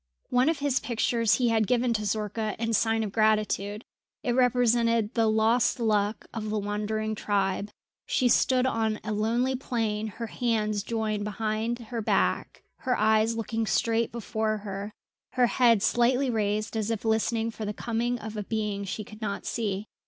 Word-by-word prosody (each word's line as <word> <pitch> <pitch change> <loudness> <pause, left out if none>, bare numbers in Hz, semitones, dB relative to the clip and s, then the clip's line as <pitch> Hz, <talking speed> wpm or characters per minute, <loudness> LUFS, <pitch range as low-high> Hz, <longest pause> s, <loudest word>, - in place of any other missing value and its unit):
One 250 +4 +4
of 325 - 0
his 280 -1 +1
pictures 230 -1 +1
he 245 -2 +2
had 220 -2 +2
given 245 -1 +2
to 215 -1 -2
Zorka 215 +1 -2
in 230 0 -1
sign 225 +1 +2
of 210 - -4
gratitude. 215 0 +1 0.4
It 245 - 0
represented 235 -2 +2
the 225 -2 +2
lost 220 +3 +2
Luck 210 -2 0
of 220 -2 -4
the 215 - -1
wandering 210 +1 -2
tribe. 200 -1 -1 0.4
She 255 - +2
stood 255 +1 +3
on 220 -4 0
a 215 - -3
lonely 235 +5 +1
plain, 220 -4 -2
her 225 +3 -6
hands 215 -3 -1
joined 215 -1 -2
behind 215 +2 -2
her 235 -1 -5
back, - - 0
her 255 -1 -1
eyes 220 +1 +3
looking 225 0 -2
straight 230 +1 +1
before 220 -1 -2
her, 200 +1 -5 0.4
her 250 -1 +4
head 235 -4 +3
slightly 250 +2 +2
raised 215 0 -1
as 220 -1 -1
if 225 -1 -3
listening 225 +1 +1
for 220 - -7
the 210 - -2
coming 235 +3 -2
of 220 -1 -7
a 210 - -2
being 210 -1 -2
she 195 +3 -4
could 215 +2 -13
not 200 -2 -3
see. 205 -3 -2
220 Hz, 170 wpm, -27 LUFS, 210-235 Hz, 0.4 s, One